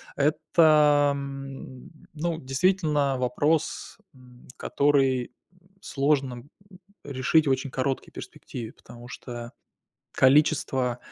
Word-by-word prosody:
это, 150 -1 +4
м, 135 -2 -8 0.2
ну, 160 +1 -2
действительно, 145 -1 +1
вопрос, 145 +5 -1 0.2
м, 125 -2 -18
который, 135 -4 +1 0.2
м, 180 0 -28
сложно, 135 -2 0
м, 120 +4 -13 0.5
решить 140 +3 +1
в - - +3
очень 130 +1 -1
короткий 130 +1 -2
перспективе. 115 -2 -9
Потому 120 0 -14
что 120 -1 -8 0.7
количество 135 -3 +3
135 Hz, 95 wpm, -26 LUFS, 130-150 Hz, 0.7 s, это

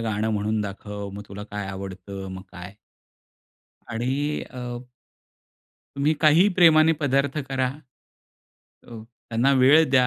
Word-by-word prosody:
गाणं 110 -1 -1
म्हणून 105 +1 -1
दाखव, 100 0 -6
मग 105 - -7
तुला 100 +1 -8
काय 105 -1 -4
आवडतं, 95 0 -7
मग 95 0 -8
काय? 90 +3 -9 1.2
आणि 135 +6 -2
अ 125 - -8 1.4
तुम्ही 145 +3 +2
काहीही 165 +6 +5
प्रेमाने 160 -2 +6
पदार्थ 140 +1 +1
करा, 135 -1 0 1.2
अ, - - -21
त्यांना 115 +3 -2
वेळ 150 +5 +7
द्या. 130 -2 +4
115 Hz, 120 wpm, -24 LUFS, 100-140 Hz, 1.4 s, वेळ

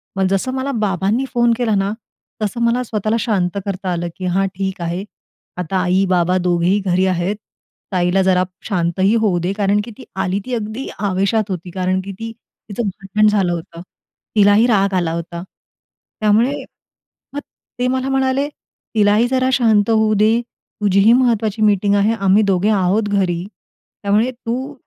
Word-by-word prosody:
मग 190 -1 +1
जसं 195 +7 0
मला 265 +1 -2
बाबांनी 200 +6 0
फोन 240 -1 +3
केला 235 -4 +1
ना, 195 0 0 0.5
तसं 215 +3 -2
मला 240 +2 +1
स्वतःला 215 -2 -1
शांत 200 -4 0
करता 190 -2 -3
आलं. 175 0 -2
की 185 - -6
हां 190 +2 +1
ठीक 190 -1 -3
आहे. 170 +3 -3 0.5
आता 180 +1 -2
आई-बाबा 185 -1 +2
दोघेही 180 +2 +2
घरी 185 0 +2
आहेत. 185 +2 0 0.6
ताईला 180 +1 +2
जरा 185 -1 +3 0.2
शांतही 190 +2 +1
होऊ 195 -5 +2
दे, 175 +2 -1
कारण 200 0 +1
की 235 - -9
ती 265 - -11
आली 190 +1 -1
ती 255 - -5
अगदी 220 +3 -4
आवेशात 200 +2 0
होती, 180 -1 -5
कारण 185 +1 -1
की 195 +1 -7
ती 225 0 -5 0.4
तिचं 210 +4 -3
भांडण 195 +2 0
झालं 195 -4 +1
होतं. 170 0 -7 0.5
तिलाही 205 +2 +5
राग 200 -4 +2
आला 175 -3 0
होता. 170 0 -5 0.8
त्यामुळे 215 +5 +3 0.8
मग 285 - -3 0.4
ते 250 - +1
मला 260 +1 -1
म्हणाले, 270 +1 +1
तिला 210 -7 -1
ही 230 +3 +3
जरा 255 0 +1
शांत 220 -4 +3
होऊ 220 -1 +3
दे. 220 +3 +3 0.4
तुझीही 200 +2 +4
महत्त्वाची 230 -4 +1
मीटिंग 205 -1 +3
आहे. 205 +2 +3
आम्ही 200 -1 +3
दोघे 195 0 +1
आहोत 205 +1 +1
घरी. 185 -4 0 0.6
त्यामुळे 210 +5 +2
तू 255 +3 -5
200 Hz, 160 wpm, -18 LUFS, 185-225 Hz, 0.8 s, तिलाही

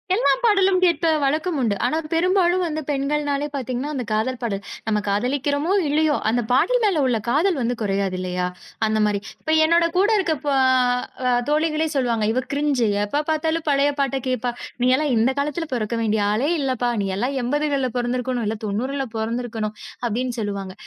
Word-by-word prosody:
எல்லா 475 - +3
பாடலும் 390 -4 +4
கேட்ட 340 -1 +3 0.2
வழக்கம் 310 +4 0
உண்டு. 220 -4 +1
ஆனா 310 +6 +1 0.2
பெரும்பாலும் 365 +1 +2
வந்து 310 -1 -3
பெண்கள்னாலே 285 +1 -1
பாத்தீங்கன்னா, 255 +2 -3
அந்தக் 250 -4 -4
காதல் 225 +4 0
பாடல். 200 -4 -2 0.3
நம்ம 210 -1 +1
காதலிக்கிறோமோ, 285 - 0 0.2
இல்லையோ. 300 +1 +2
அந்தப் 235 -1 0
பாடல் - - +3
மேல 390 -8 +2
உள்ள 245 -3 +2
காதல் 315 +8 +2
வந்து 240 +1 0
குறையாதில்லையா, 185 -3 -1 0.4
அந்த 215 0 +1
மாரி. 205 -1 0 0.2
இப்ப 315 - 0
என்னோட 335 +1 +4
கூட 395 - +4
இருக்க 340 -4 +1
ப 290 - +1 0.8
அ 250 - +3 0.2
தோழிகளே 310 +1 +1
சொல்லுவாங்க, 240 -5 +1
"இவ 255 - +1
க்ரிஞ்சு. 280 -5 +1 0.2
எப்ப 285 +9 -1
பார்த்தாலும் 320 +1 -1
பழைய 280 0 +3
பாட்ட 275 -1 +1
கேட்பா. 250 -1 -1 0.3
நீயெல்லாம் 265 +3 +3
இந்தக் 260 +5 +2
காலத்துல 300 +4 -2
பொறக்க 235 -1 -1
வேண்டிய 215 -1 +1
ஆளே 245 +8 +1
இல்லப்பா. 255 -3 0
நீ 195 - -1
எல்லாம் 255 +6 -1
எம்பதுகள்ல 280 0 0
பொறந்திருக்கணும். 245 0 -1
இல்ல 220 - -2
90ல 260 +7 -2
பொறந்திருக்கணும்." 225 -1 -3 0.3
அப்படீன்னு 240 +2 -2
சொல்லுவாங்க. 200 -3 -4
265 Hz, 160 wpm, -22 LUFS, 230-305 Hz, 0.8 s, பாடலும்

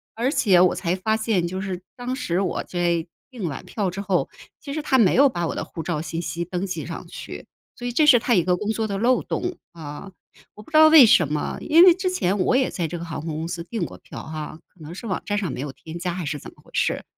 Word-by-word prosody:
而 240 +4 0
且 215 - +4
我 180 0 +5
才 175 0 -1
发 220 +4 0
现 220 -5 0
就 185 +2 -4
是 185 -2 -4 0.2
当 250 +1 -3
时 180 -9 -1
我 190 - -2
在 175 -2 -1 0.3
订 225 -8 -4
完 145 - -6
票 200 -5 -2
之 195 +3 -5
后， 195 -3 0 0.3
其 280 - -7
实 310 - -2
他 280 -3 +2
没 220 -7 +5
有 275 +2 +6
把 175 -7 -2
我 - - -4
的 - - -3
护 165 - -7
照 160 -2 -2
信 165 +1 -4
息 170 0 -3
登 180 +2 -3
记 185 - -4
上 - - -7
去， - - -9 0.3
所 245 - -5
以 - - -2
这 300 +6 +3
是 255 - +8
他 240 +1 +1
一 180 -6 +4
个 180 +1 +1
工 210 +3 -4
作 220 0 -1
的 200 -2 -3
漏 240 +4 +2
洞， 360 0 -3 0.2
啊。 160 +3 -9 0.4
我 210 - -11
不 - - -18
知 310 - +4
道 315 0 +9
为 310 -5 +10
什 175 -7 +5
么， 150 - -2
因 330 +3 +6
为 365 -1 +9
之 370 0 -1
前 200 - 0
我 185 - +2
也 260 0 +2
在 170 -3 -2
这 175 - -5
个 - - -6
航 165 -2 -5
空 160 0 -5
公 160 +1 -3
司 170 0 -5
订 220 +6 -4
过 - - -10
票 - - -10
哈， 155 0 -7
可 - - -31
能 155 +1 -9
是 230 - -7
网 190 - -2
站 205 - -1
上 200 -4 -2
没 - - -6
有 140 +1 -4
添 160 +4 -9
加 175 0 -3
还 180 0 -4
是 150 +1 -3
怎 - - -11
么 - - -23
回 - - -21
事， - - 0
185 Hz, 300 characters per minute, -23 LUFS, 170-240 Hz, 0.4 s, 为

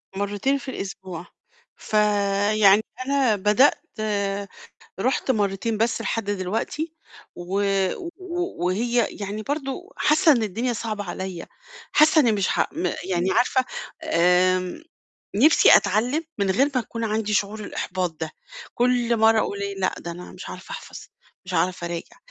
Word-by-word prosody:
مرتين 205 +8 0
في 265 0 -7
الأسبوع. 190 -4 -6 0.5
فيعني 205 0 +3 0.2
أنا 270 -5 +2
بدأت 210 +7 +3 1.2
رُحت 260 +2 0
مرتين 210 0 0
بس 230 +2 +1
لحد 225 - -2
دلوقتي 220 - -3 0.4
و 175 +2 -6 0.6
و 355 - -3
وهي 235 +5 +1
يعني 205 +1 -5
برضو 285 - -4
حاسة 315 +2 +4
إن 240 -5 +2
الدنيا 225 +4 -1
صعبة 215 -2 -4
عليَّ، 185 -1 -5 0.5
حاسة 310 +1 +6
إني 240 -6 +3
مش 200 -3 0
ح - - 0
م - - -2 0.2
يعني 185 0 0
عارفة، 255 +1 +2 0.4
آمم، 180 - +2 0.5
نفْسي 295 +10 +7
أتعلم 235 - 0
من 200 -2 +1
غير 275 +9 +2
ما 255 - +3
يكون 230 +1 -6
عندي 215 -1 -1
شعور 210 +1 0
الإحباط 185 -3 -3
ده، 160 -1 -3 0.4
كل 240 -1 +2
مرّة 220 0 +5
أقول 200 -1 -2
إيه 200 0 -3
لأ، 185 -1 0
ده 170 - -6
أنا 175 +1 -9
مش - - -9
هاعرف - - -10
أحفظ، - - -8 0.5
مش 185 - -6
هاعرف 180 +1 0
أراجع، 170 -1 -5
210 Hz, 140 wpm, -24 LUFS, 190-250 Hz, 1.2 s, نفْسي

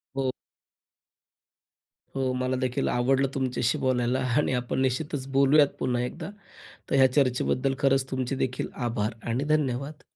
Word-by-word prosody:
हो. 135 -1 0 1.8
हो. 135 -1 0
मला 130 0 -1
देखील 130 -1 -1
आवडलं 130 +3 +2
तुमच्याशी 130 -3 0
बोलायला 125 0 +1 0.2
आणि 150 - +2
आपण 125 +1 -1
निश्चितच 135 +1 -1
बोलूयात 140 +2 +5
पुन्हा 125 -1 0
एकदा. 160 +8 -5 0.6
तर - - 0
ह्या 130 -1 +5
चर्चेबद्दल 135 0 +1
खरंच 135 -1 +2
तुमचे 130 0 -2
देखील 130 -1 -2 0.2
आभार 110 -1 -1 0.2
आणि 120 +4 0
धन्यवाद. 140 0 -2
130 Hz, 130 wpm, -26 LUFS, 125-135 Hz, 1.8 s, बोलूयात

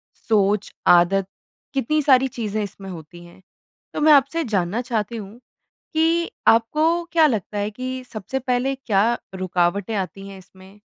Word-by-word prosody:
सोच, 210 -1 0 0.2
आदत 180 +2 +4 0.5
कितनी 285 +3 +1
सारी 265 -2 +4
चीज़ें 215 -4 -4
इसमें 195 -1 -8
होती 175 0 -10
हैं। 175 +2 -17 0.5
तो - - -3
मैं 305 0 +7
आपसे 285 +4 +3
जानना 205 - -1
चाहती 235 -2 -3
हूँ 210 +2 -9 0.5
कि 330 +1 +1 0.2
आपको 310 +9 +3
क्या 325 -2 +5
लगता 210 - -2
है 205 +1 -1
कि 255 +3 -6
सबसे 215 +5 -4
पहले 255 +1 -1
क्या 230 -4 +1 0.2
रुकावटें 185 +2 -1
आती 195 0 -5
हैं 195 -1 -10
इसमें? 190 +2 -18
215 Hz, 150 wpm, -22 LUFS, 195-265 Hz, 0.5 s, मैं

